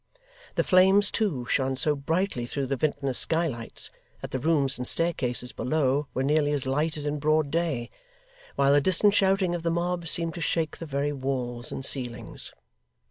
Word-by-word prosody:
The -, -, +2 dB
flames 190 Hz, +2 st, +5 dB
too, 170 Hz, -, -1 dB
shone 130 Hz, +2 st, 0 dB
so 150 Hz, +3 st, +3 dB
brightly 145 Hz, -3 st, -1 dB
through 140 Hz, +2 st, -3 dB
the 135 Hz, +1 st, -1 dB
vintner's 140 Hz, -2 st, -1 dB
skylights, 160 Hz, -9 st, -1 dB, 0.3 s
that -, -, -7 dB
the 130 Hz, -, -2 dB
rooms 140 Hz, -3 st, +1 dB
and 125 Hz, -, 0 dB
staircases 125 Hz, -7 st, -1 dB
below 145 Hz, 0 st, 0 dB
were 130 Hz, -, 0 dB
nearly 145 Hz, +1 st, +2 dB
as 140 Hz, -3 st, 0 dB
light 150 Hz, +4 st, 0 dB
as 150 Hz, -, -4 dB
in 150 Hz, 0 st, -2 dB
broad 155 Hz, 0 st, +1 dB
day; 160 Hz, -8 st, -1 dB, 0.7 s
while 140 Hz, 0 st, +3 dB
the 145 Hz, -, +5 dB
distant 190 Hz, +5 st, +4 dB
shouting 195 Hz, -3 st, +2 dB
of 175 Hz, -, -3 dB
the 165 Hz, -, -1 dB
mob 170 Hz, 0 st, -2 dB
seemed 165 Hz, +1 st, -1 dB
to 175 Hz, -, -7 dB
shake 160 Hz, -2 st, -1 dB
the 165 Hz, -, -6 dB
very 145 Hz, +1 st, -1 dB
walls 125 Hz, -3 st, -3 dB
and 135 Hz, -, -3 dB
ceilings. 120 Hz, -5 st, -1 dB
145 Hz, 180 wpm, -26 LUFS, 130-165 Hz, 0.7 s, flames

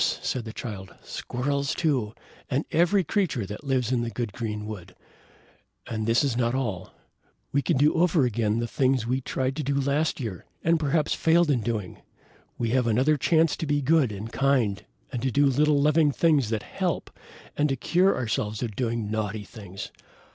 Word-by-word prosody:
said 125 Hz, -3 st, -2 dB
the 110 Hz, -, -6 dB
Child. 100 Hz, -5 st, -7 dB
"Squirrels, 140 Hz, +2 st, -2 dB
too, 130 Hz, -10 st, 0 dB, 0.3 s
and 140 Hz, +3 st, 0 dB
every 175 Hz, +4 st, +3 dB
creature 170 Hz, -, 0 dB
that 105 Hz, +8 st, -8 dB
lives 130 Hz, -4 st, 0 dB
in 125 Hz, -2 st, +1 dB
the 120 Hz, -, -2 dB
good 115 Hz, -3 st, -4 dB
green 105 Hz, -2 st, -4 dB
wood. 95 Hz, -4 st, -8 dB, 0.9 s
And 110 Hz, -1 st, -3 dB
this 115 Hz, +4 st, +3 dB
is 135 Hz, -5 st, 0 dB
not 120 Hz, 0 st, +1 dB
all! 105 Hz, -9 st, -3 dB, 0.6 s
We 140 Hz, -, +2 dB
can -, -, +1 dB
do 145 Hz, +3 st, +4 dB
over 165 Hz, -4 st, +3 dB
again 110 Hz, -2 st, 0 dB
the 120 Hz, -, 0 dB
things 130 Hz, +1 st, +1 dB
that 115 Hz, -, -5 dB
we 130 Hz, +1 st, +1 dB
tried 130 Hz, +1 st, -2 dB
to 155 Hz, -, -2 dB
do 140 Hz, +1 st, -1 dB
last 140 Hz, +4 st, 0 dB
year, 110 Hz, -9 st, -5 dB, 0.2 s
and 165 Hz, 0 st, +3 dB
perhaps 150 Hz, 0 st, +1 dB
failed 165 Hz, -1 st, +3 dB
in 125 Hz, -4 st, +1 dB
doing. 105 Hz, -5 st, -4 dB, 0.6 s
We 115 Hz, -1 st, -1 dB
have 125 Hz, -1 st, +2 dB
another 130 Hz, +7 st, +3 dB
chance 160 Hz, +2 st, +3 dB
to 160 Hz, -, -3 dB
be 145 Hz, -1 st, +1 dB
good 145 Hz, -4 st, +3 dB
and 105 Hz, +3 st, -7 dB
kind, 130 Hz, -8 st, +1 dB, 0.3 s
to 130 Hz, 0 st, -1 dB
do 145 Hz, +3 st, +3 dB
little 145 Hz, +2 st, +3 dB
loving 150 Hz, +1 st, +4 dB
things 145 Hz, -6 st, +2 dB
that 110 Hz, -2 st, -2 dB
help, -, -, -3 dB, 0.4 s
and 150 Hz, 0 st, +2 dB
to 135 Hz, -, +1 dB
cure 180 Hz, +9 st, +2 dB
ourselves 110 Hz, -2 st, -2 dB
of 110 Hz, -4 st, -4 dB
doing 115 Hz, -4 st, -2 dB
naughty 110 Hz, -1 st, -2 dB
things. 100 Hz, -2 st, -9 dB
130 Hz, 185 wpm, -26 LUFS, 110-145 Hz, 0.9 s, do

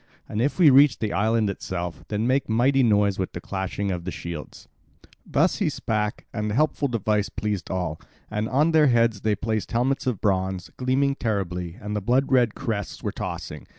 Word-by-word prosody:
And 105 Hz, -, -2 dB
if 140 Hz, +4 st, 0 dB
we 165 Hz, -6 st, +7 dB
reach 140 Hz, +2 st, +6 dB
the 110 Hz, -2 st, -2 dB
island 110 Hz, +1 st, +2 dB
itself, 90 Hz, -3 st, -4 dB
then 105 Hz, +1 st, -1 dB
make 130 Hz, +1 st, +1 dB
mighty 130 Hz, +5 st, +3 dB
noise 105 Hz, -5 st, +3 dB
with 95 Hz, -, -2 dB
the -, -, -5 dB
clashing 95 Hz, +2 st, -3 dB
of 90 Hz, 0 st, -4 dB
shields." 85 Hz, -4 st, -7 dB, 0.6 s
Thus 165 Hz, +6 st, +2 dB
he 200 Hz, -7 st, +1 dB
spake, 110 Hz, -6 st, -2 dB
and 105 Hz, -1 st, -2 dB
the 105 Hz, -, -2 dB
helpful 150 Hz, 0 st, +2 dB
device 105 Hz, -4 st, 0 dB
pleased 105 Hz, -5 st, -3 dB
all. 90 Hz, -4 st, -3 dB, 0.3 s
And 110 Hz, +1 st, -2 dB
on 150 Hz, +5 st, +3 dB
their 155 Hz, -2 st, +5 dB
heads 115 Hz, -4 st, +2 dB
they 105 Hz, -1 st, +1 dB
placed 110 Hz, +2 st, -3 dB
helmets 130 Hz, +3 st, 0 dB
of 125 Hz, -6 st, 0 dB
bronze, 95 Hz, -2 st, -1 dB
gleaming 130 Hz, +2 st, +1 dB
terribly, 90 Hz, -6 st, -2 dB
and 105 Hz, 0 st, -5 dB
the 105 Hz, -, -1 dB
blood 125 Hz, +7 st, +1 dB
red 125 Hz, -4 st, +3 dB
crests 110 Hz, -6 st, -4 dB
were -, -, -1 dB
tossing. 75 Hz, -5 st, -6 dB
110 Hz, 185 wpm, -24 LUFS, 95-130 Hz, 0.6 s, we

